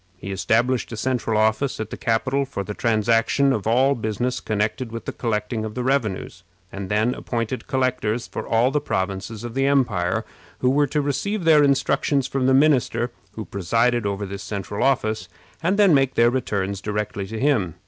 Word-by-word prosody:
He 100 +1 -7
established 115 +6 +1
a 115 - -5
central 115 -2 0
office 110 +5 +1
at 110 -1 -4
the - - -4
capital 130 +4 0
for 130 -7 -5
the 105 - -5
transaction 115 +5 +2
of 110 -3 -3
all 130 +5 +4
business 120 +2 -2
connected 110 +3 -2
with 115 0 -6
the - - -3
collecting 110 -1 -2
of 110 -1 -5
the 125 - -2
revenues, 125 -7 -1 0.3
and 95 -1 -6
then 110 +4 +2
appointed 120 0 -4
collectors 125 -4 0
for - - -6
all 115 +3 +3
the 150 +1 0
provinces 100 0 -3
of 120 -1 -6
the 135 +1 +1
empire, 110 -11 +1 0.3
who 125 - +2
were 145 +1 +3
to 150 +3 0
receive 200 +8 -1
their 160 -2 +6
instructions 140 0 +2
from 130 -1 -1
the 130 - +4
minister 130 -4 +2 0.2
who 110 - -6
presided 115 +5 +1
over 100 0 -2
this 100 +1 -6
central 100 0 -4
office, 110 -8 0 0.3
and 180 +4 +1 0.2
make 135 -2 +2
their 120 0 +4
returns 100 -6 -2
directly 105 -1 -3
to 110 +2 -5
him. 110 - +1
115 Hz, 180 wpm, -23 LUFS, 105-130 Hz, 0.3 s, their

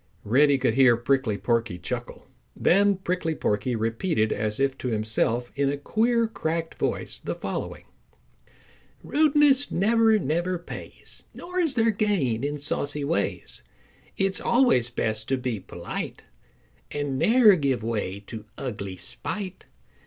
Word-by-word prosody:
Reddy 140 +6 +4
could 125 -3 +1
hear 130 -2 +5
Prickly 120 -3 +1
Porky 115 -5 0
chuckle. - - -6 0.3
Then 200 +2 +4
Prickly 180 -3 -2
Porky 120 +2 0
repeated 115 - 0
as 105 +1 -2
if 135 -1 +1
to - - -3
himself 110 +2 0
in 140 0 +1
a 145 - -1
queer 230 +9 +1
cracked 165 -6 -3
voice - - -2
the - - -4
following: - - -5 1.2
"Rudeness 290 -2 +4
never, 220 +3 +3
never 175 +2 -1
pays, 175 - -9
Nor 360 +1 -4
is 320 -7 +1
there 225 -1 +3
gain 185 - 0
in 145 +1 -1
saucy 145 0 -2
ways. 155 +4 -2 0.6
It's 195 0 +1
always 235 - +3
best 110 -2 -1
to 135 - +2
be 125 -4 -3
polite - - -6 0.7
And 145 -2 -2
ne'er 225 -3 +6
give 135 -7 0
way 105 -4 -2
to 110 +1 -9
ugly 100 -7 -5
spite. 190 - -5
140 Hz, 135 wpm, -25 LUFS, -, 1.2 s, ne'er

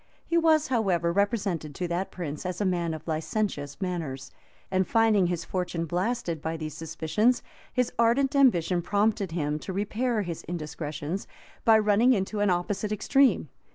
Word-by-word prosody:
He 335 - -2
was, 315 -2 +4
however, 185 -9 +1
represented 195 - 0
to 180 - -2
that 175 +3 -1
prince 155 -5 -5
as 180 -1 -4
a 205 - 0
man 170 -3 0
of 155 - -11
licentious 155 -2 -2
manners;[*] 160 -8 -4 0.4
and 185 -1 +1
finding 220 -5 +4
his 170 -1 -2
fortune 180 -2 -2
blasted 180 -1 -2
by 160 +1 -3
these 155 -2 -5
suspicions, 165 +9 0 0.3
his 250 -2 0
ardent 260 +5 +3
ambition 185 -10 +4
prompted 205 -1 +1
him 150 -2 -1
to 190 - -6
repair 215 +4 -1
his 170 -3 -5
indiscretions, 155 +1 -4 0.4
by 225 -1 +7
running 215 +4 +4
into 205 0 -1
an 205 -1 +3
opposite 190 +4 -1
extreme. 270 +6 +3
185 Hz, 155 wpm, -27 LUFS, 165-220 Hz, 0.4 s, by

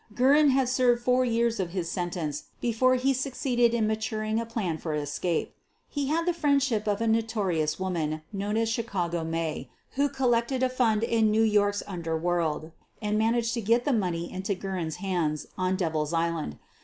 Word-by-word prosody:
Guerin 285 +4 +5
had 265 -1 +3
served 245 -1 +2
four 250 +1 +3
years 235 -1 +1
of 180 -2 -2
his 180 -3 -2
sentence 170 -4 -3
be 240 - 0
fore 255 +3 +4
he 265 +2 +2
succeeded 255 -2 +1
in 225 -2 +2
maturing 220 0 -1
a 230 - -4
plan 195 -9 -2
for 155 -2 -3
escape. 150 +3 -2 0.3
He 285 -2 -2
had 330 +3 0
the 355 - +2
friendship 275 -9 +1
of 205 +1 0
a 230 - +1
notorious 210 -9 0
woman 160 -5 -2
known 205 +2 -1
as 225 0 +1
"Chicago 185 -7 -1
May," 165 -1 -3 0.2
who 285 +1 +1
collected 255 -1 +1
a 260 - +3
fund 230 -4 +1
in 225 -2 +3
New 220 +1 +3
York's 205 -2 +2
underworld 165 -3 -2 0.3
and 210 -1 -1
managed 230 +1 +1
to 235 - -1
get 230 +3 +2
the 285 - +2
money 175 -6 -1
into 190 +2 -2
Guerin 185 -3 -3
's 160 - -5
hands 175 -5 -1
on 185 0 0
Devil's 160 -4 -1
Island. 165 - -1
215 Hz, 180 wpm, -27 LUFS, 175-240 Hz, 0.3 s, Guerin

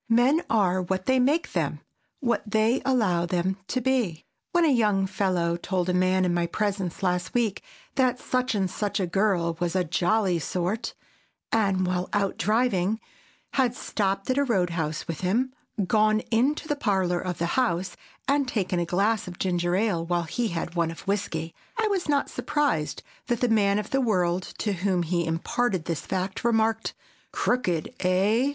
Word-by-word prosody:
Men 250 +8 +4
are 185 -4 +2
what 185 +1 -2
they 260 0 +3
make 290 +6 +1
them, - - -1 0.4
what 240 -3 +1
they 220 +4 +2
allow 210 -10 +2
them 180 +2 0
to 255 - 0
be. 235 -11 0 0.3
When 345 -1 +4
a 300 - +4
young 210 -5 +3
fellow 185 -3 0
told 180 0 -1
a - - +2
man 185 +1 +3
in 175 - +1
my 175 0 +1
presence 195 -2 -2
last 180 +2 0
week 225 -5 +1 0.4
that 255 -2 +2
such 255 -2 0
and 195 -2 +1
such 205 +3 -2
a 190 - +1
girl 180 -2 +1
was 175 0 -1
a 185 - +3
"jolly 180 +2 +1
sort," 180 +7 -2 0.6
and, 195 -4 +2
while 180 0 -1
out 200 -1 0
driving, 215 0 +1 0.5
had 255 -3 +2
stopped 195 -4 -1
at 260 - +1
a - - +4
roadhouse 170 - -1
with 165 0 -4
him, 235 +8 +1 0.3
gone 215 +2 +3
into 270 +7 +2
the 295 - 0
parlor 190 -9 +1
of 180 -2 -3
the 170 - 0
house 190 -8 0 0.3
and 280 0 +2
taken 190 -7 -1
a 170 - 0
glass 200 +5 +1
of 175 -1 -8
ginger 175 -1 0
ale 195 -5 +1
while 175 0 0
he 235 +8 -1
had 170 -2 -3
one 170 -2 +1
of 165 - -8
whisky, 175 -5 -2 0.2
I 445 -1 +2
was 380 -6 -1
not 285 -1 +2
surprised 285 - -1 0.2
that 240 -1 0
the 245 - +2
man 200 -3 +3
of 210 0 -4
the 270 - +2
world 180 -6 0
to 210 - -1
whom 185 -1 0
he 170 0 0
imparted 175 +3 0
this 165 -4 -2
fact, 190 0 -2
remarked, 225 -1 +1 0.4
"Crookéd, 180 -10 0
eh?" 200 +8 +3
195 Hz, 175 wpm, -26 LUFS, 175-235 Hz, 0.6 s, Men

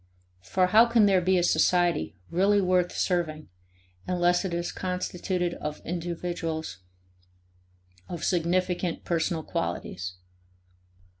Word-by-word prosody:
For 185 - +1
how 220 +6 +6
can 230 -2 +4
there 190 -2 +4
be 185 +1 +2
a 175 - +2
society 175 - +2 0.2
really 200 +4 +3
worth 180 -2 +2
serving 160 -4 -1 0.6
unless 175 0 +2
it 190 - -3
is 170 0 -2
constituted 180 -1 -2
of 150 -2 -5
individuals 165 - -4 1.3
of 175 -3 -5
significant 180 0 0
personal 165 -1 -1
qualities? 95 -9 -4
175 Hz, 105 wpm, -27 LUFS, 165-185 Hz, 1.3 s, how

